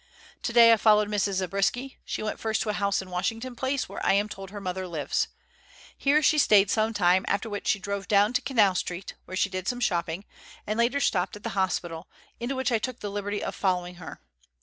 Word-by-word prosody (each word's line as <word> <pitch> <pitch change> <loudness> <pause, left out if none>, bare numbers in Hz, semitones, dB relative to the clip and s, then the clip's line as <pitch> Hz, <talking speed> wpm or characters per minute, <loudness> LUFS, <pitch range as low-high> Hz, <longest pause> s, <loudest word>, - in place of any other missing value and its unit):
Today 235 -1 +6
I - - +4
followed 210 -1 +4
Mrs. 205 -1 0
Zabriskie. 195 +8 -1
She - - -4
went 215 - -3
first 220 -1 0
to 220 - -4
a - - +1
house 200 -1 0
in 185 - -13
Washington 225 +7 -3
Place 265 +2 -1
where - - -7
I - - +3
am 205 +1 +2
told 195 -2 -8
her 205 +1 -7
mother 185 -1 -4
lives. 160 -5 -1 0.7
Here 295 +2 +2
she 305 - +4
stayed 205 -6 +5
some 220 0 +1
time, 185 -3 +3
after 205 +2 -1
which 205 - -5
she 235 - +3
drove 200 0 -4
down 205 +2 +4
to 250 - +1
Canal 215 -8 +3
Street, 180 0 -4
where 185 - -6
she 200 - +2
did 185 0 -4
some 245 - -1
shopping, 175 -4 -1 0.4
and 215 +2 -2
later 240 +4 +2
stopped 185 -8 0
at 210 - -12
the - - -2
hospital, 175 -4 -2 0.3
into 245 +3 -3
which 260 0 0
I 230 - +2
took 255 +2 -4
the 205 - -4
liberty 205 0 -3
of - - -3
following 180 -2 -1
her. 160 - -9
205 Hz, 220 wpm, -27 LUFS, 185-230 Hz, 0.7 s, Today